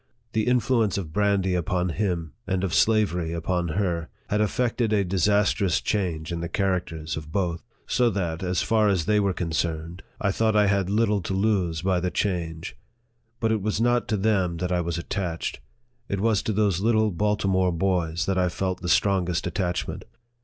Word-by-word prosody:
The 110 0 0
influence 120 -5 +2
of 80 -6 -5
brandy 100 -2 +2
upon 90 +1 0
him, 85 -4 -2
and 95 -1 0
of 90 -4 -1
slavery 95 -7 +2
upon 85 +1 -1
her, 85 -5 -1 0.2
had 105 +1 +1
effected 115 +1 0
a 105 -2 +3
dis 95 0 +1
astrous 100 - +2
change 85 - -2
in 85 - -2
the 85 0 -4
characters 90 -5 -1
of 75 -1 -7
both; 85 -2 -1 0.2
so 125 -2 +2
that, 85 -6 -2
as 90 -1 0
far 110 -2 +3
as 90 -5 +1
they 105 +2 +3
were 100 -1 +2
concerned, 85 0 -3 0.2
I 100 - +1
thought 110 +2 +1
I 105 -1 +5
had 100 -2 +1
little 105 -1 +2
to 95 +2 -3
lose 95 -6 0
by 95 -1 +2
the 90 +1 -1
change. 85 -4 -2 0.6
But 115 -1 +1
it 110 -2 +1
was 105 +1 -1
not 120 +1 +2
to 110 - 0
them 95 -4 +1
that 90 +1 -2
I 90 -1 +2
was 85 0 -2
attached. 85 -1 -3 0.5
It 100 - -1
was 105 -1 +2
to - - -2
those 100 -4 +1
little 110 -1 +3
Baltimore 95 -1 +1
boys 85 -1 0
that 95 -1 0
I 90 -1 +2
felt 95 0 -3
the 90 - -3
strongest 90 -2 +2
attachment. 90 0 -2
95 Hz, 185 wpm, -25 LUFS, 85-105 Hz, 0.6 s, I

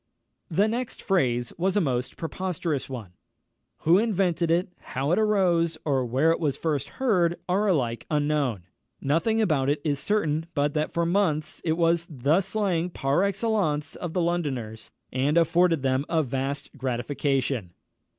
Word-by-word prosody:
The 195 +5 +3
next 235 +2 -3
phrase 125 - 0
was 190 +3 +1
a - - +5
most 130 -7 -1
preposterous 165 -4 -3
one. 115 -8 -7 0.7
Who 170 +4 +5
invented 185 -6 +1
it, 175 +3 +2
how 135 +4 -3
it 180 - +3
arose, 180 -6 +2
or 135 -4 +1
where 135 +7 +3
it 165 - 0
was 150 -5 0
first 150 -5 -1
heard, 180 -10 +2
are 195 +4 +1
alike 125 - 0
unknown. 145 - 0 0.4
Nothing 165 +11 +1
about 155 -11 +2
it 145 +1 +1
is 145 -3 0
certain, 160 -6 0
but 145 0 +1
that 155 0 -1
for 170 0 0
months 170 -4 0
it 160 - +1
was 170 0 +2
the 150 +5 +2
slang 190 -3 -1
par 140 -1 0
excellence 195 -7 0
of 175 -2 -5
the 180 - +1
Londoners, 135 -11 -2 0.2
and 140 +5 +1
afforded 170 -2 +3
them 130 +1 +1
a 165 -2 +2
vast 135 +2 -3
gratification. 130 - -1
160 Hz, 155 wpm, -26 LUFS, 135-180 Hz, 0.7 s, a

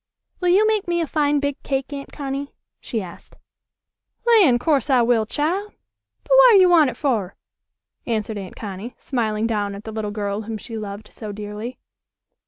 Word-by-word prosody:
"Will 360 - +1
you 390 +5 +5
make 430 -3 +1
me 345 0 0
a 335 - +1
fine 295 -1 +1
big 285 -1 -2
cake, 270 +1 -2
Aunt 280 -1 -7
Connie?" 280 0 -5 0.2
she 225 -4 -3
asked. 175 -2 -12 0.9
"Lan', 410 - +6
course 280 0 +1
I 255 -3 +4
will, 230 -2 +2
chile! 360 - -2 0.5
But, - - -12
w'at - - +8
you 365 -1 +6
wan' 320 -6 +6
it 240 - -8
fer?" 220 -10 -1 0.7
answered 220 -2 -2
Aunt 190 -2 -8
Connie, 205 +3 -7
smiling 220 -4 -1
down 205 -3 -1
at 200 - -9
the 220 - -7
little 215 -1 -3
girl 205 0 -3
whom 220 0 -5
she 225 +2 -8
loved 210 -1 -7
so 215 -2 -7
dearly. 210 +4 -6
240 Hz, 180 wpm, -22 LUFS, 215-300 Hz, 0.9 s, w'at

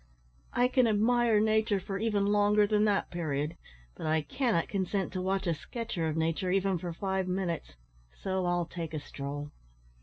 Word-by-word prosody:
"I 245 - +4
can 255 -1 +3
admire 225 +1 +3
nature 220 -1 +2
for 195 +1 -4
even 210 -2 +1
longer 205 0 +4
than 210 0 +2
that 205 -2 +1
period, 155 -2 -2 0.4
but 155 - -5
I 155 0 +2
cannot 215 - 0
consent 195 -1 -1
to 185 - -2
watch 190 +1 0
a 170 - +2
sketcher 185 0 -4
of 155 0 -2
nature 165 +3 0
even 190 -1 +1
for 175 0 -4
five 190 +2 -2
minutes, 180 - -2 0.4
so 190 -1 -1
I'll 175 -1 +1
take 165 -2 -6
a - - -1
stroll." 145 +1 -6
190 Hz, 175 wpm, -30 LUFS, 165-210 Hz, 0.4 s, I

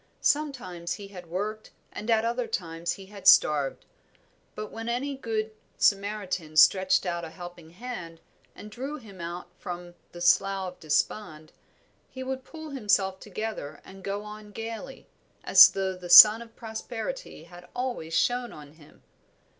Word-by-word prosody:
Sometimes 270 - -1
he 200 -1 -10
had 180 -4 -11
worked 210 +5 -4 0.2
and 215 - -7
at 225 0 +3
other 240 +1 -1
times 165 -2 -3
he 195 - -11
had 195 -1 -7
starved; 150 -7 +5 0.7
but 215 -1 -6
when 225 +1 -6
any 270 +4 -2
good 220 -4 -3 0.3
Samaritan 195 -6 0
stretched 190 +4 +5
out 170 -1 -2
a 165 - -6
helping 175 -1 -11
hand 175 -4 -8 0.4
and 210 - -11
drew 270 +7 -5
him 200 - -12
out 175 +1 -6
from 175 -2 -7 0.2
the 175 - -10
Slough 190 +1 +2
of - - -29
Despond, 155 0 -2 0.6
he 260 0 -7
would 260 0 -4
pull 315 +1 -10
himself 200 -7 +1
together 210 -7 -6
and 190 0 -13
go 200 +2 -3
on 210 0 -10
gaily, 225 +5 -7 0.4
as - - +9
though 190 -1 -2
the 180 -1 -10
sun 215 +5 +11
of 230 -1 -13
prosperity 235 - -6
had 175 +1 -14
always 240 -11 -3
shone 245 0 +1
on 150 -1 -12
him. 150 -1 -20
200 Hz, 155 wpm, -27 LUFS, 175-230 Hz, 0.7 s, sun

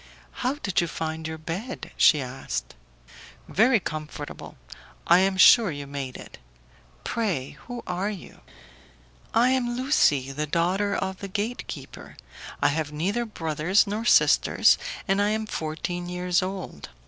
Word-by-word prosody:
"How 255 +3 0
did 200 -13 0
you 170 - -1
find 160 0 -4
your 160 0 -5
bed?" 180 +11 -6
she 150 -4 +5
asked. 125 - -5 0.7
"Very 230 +3 +4
comfortable; 155 -3 -7 0.5
I 175 +2 +6
am 190 0 +2
sure 220 +2 +7
you 145 -2 -5
made 140 -2 -6
it. - - -12 0.6
Pray, 190 - -2 0.2
who 245 -1 -6
are 180 +3 -2
you?" 200 -5 -9 0.9
"I 240 +3 +5
am 245 -2 0
Lucie, 150 - +2
the 150 +2 -3
daughter 185 +6 +1
of 190 0 -3
the 200 - -6
gate 210 +5 -3
keeper: - - -9 0.5
I - - +5
have 150 0 -2
neither 195 +11 -1
brothers 165 -2 +1
nor 210 +2 -3
sisters, 240 - +4 0.3
and 195 0 +2
I 205 - +2
am 220 +1 -1
fourteen 175 0 -4
years 180 0 0
old. 185 - -6
180 Hz, 145 wpm, -25 LUFS, 155-215 Hz, 0.9 s, sure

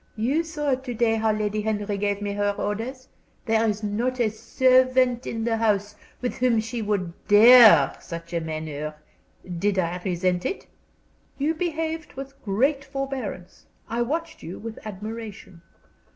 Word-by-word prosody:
"You 265 +9 +1
saw 295 -4 -1
to 255 -1 -4
day 225 -1 +2
how 220 0 +2
Lady 210 0 -1
Henry 210 -1 -2
gave 205 0 -1
me 205 - -2
her 205 0 0
orders. 235 +6 -4 0.4
There 225 -1 +2
is 210 +1 -3
not 235 +5 -1
a 225 -3 +2
servant 255 +2 +3
in 225 -1 -3
the 225 -1 0
house 210 -2 +1 0.3
with 250 - -3
whom 245 -2 +3
she 225 +2 -3
would 200 -5 -1
dare 225 +2 +8
such 170 +1 -8
a 170 - 0
manner. 155 -1 -5 0.6
Did 200 +1 +1
I 180 0 -1
resent 180 -1 0
it?" 390 - -3 0.7
"You 295 +3 +1
behaved 320 -1 -3
with 275 +1 -9
great 270 +8 +1
forbearance. 270 -9 -6 0.2
I 235 +1 -2
watched 320 +6 -3
you 175 - -7
with 225 0 -8
admiration." 215 -3 -8
225 Hz, 150 wpm, -25 LUFS, 205-255 Hz, 0.7 s, dare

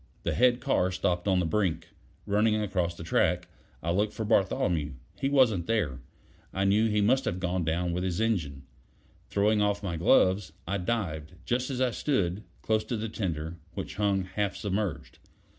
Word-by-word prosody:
The - - 0
head 125 0 +3
car 125 -9 +2
stopped 90 0 -1
on 95 -2 +3
the 90 - +1
brink. 80 -3 0 0.4
Running 105 +2 +2
across 95 -5 -1
the 80 - -8
track, 80 - +1 0.4
I 85 - 0
looked 105 +4 +1
for 110 - -3
Bartholomew. 90 - +1 0.3
He 135 - +1
wasn't 120 -11 +3
there; 85 - 0 0.5
I 95 - -1
knew 105 +3 +4
he 105 -1 +2
must 130 +6 +3
have 90 - -1
gone 90 0 -1
down 85 +2 0
with 90 +1 -2
his 95 0 -1
engine. 85 -12 -1 0.7
Throwing 105 +1 +2
off 105 0 +1
my 85 -4 -2
gloves, 95 +3 +3
I 100 +2 -1
dived, 90 -6 -2
just 125 +2 0
as 130 -2 -3
I 130 -1 +2
stood, 100 - 0 0.2
close 110 -1 +1
to 120 - -2
the 110 +1 -3
tender, 85 -6 -3 0.2
which 75 +4 -5
hung 100 -2 +1
half 100 +2 -2
submerged. 100 -4 -3
95 Hz, 175 wpm, -28 LUFS, 85-110 Hz, 0.7 s, knew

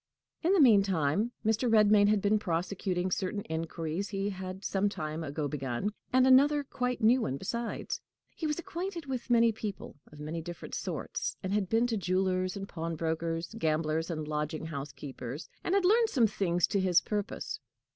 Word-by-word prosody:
In 350 +3 +3
the 395 - +4
meantime 200 - +4
Mr. 225 +3 +2
Redmain 210 -2 +6
had 210 -1 +2
been 210 +1 +3
prosecuting 185 0 -1
certain 195 +3 -1
inquiries 165 +3 -3
he 200 0 -2
had 190 0 -7
some 200 +1 +1
time 160 -4 -4
ago 145 0 -2
begun, 135 - -2 0.2
and 255 0 +5
another 285 +3 +6
quite 250 -2 -2
new 245 +4 +5
one 135 - -1
besides. 235 +8 -3 0.3
He 320 - -2
was 300 - -1
acquainted 345 -1 -5
with 260 -2 -4
many 230 -1 +5
people 205 -8 -6
of 150 - -13
many 155 +3 -4
different 175 +1 -8
sorts, - - -3
and 190 +1 -2
had 200 -3 0
been 225 +2 +3
to 230 -2 0
jewelers 185 0 0
and 195 0 -5
pawnbrokers, 165 +1 -3
gamblers 160 -1 0
and 155 -3 -3
lodging 150 +1 -2
house 145 -3 -5
keepers, 135 +2 -7 0.2
and 365 - +1
had 395 -2 +3
learned 450 +4 +5
some 250 - +4
things 180 -4 +1
to 200 - 0
his 185 -2 +4
purpose. 210 +4 -3
195 Hz, 175 wpm, -30 LUFS, 165-230 Hz, 0.3 s, Redmain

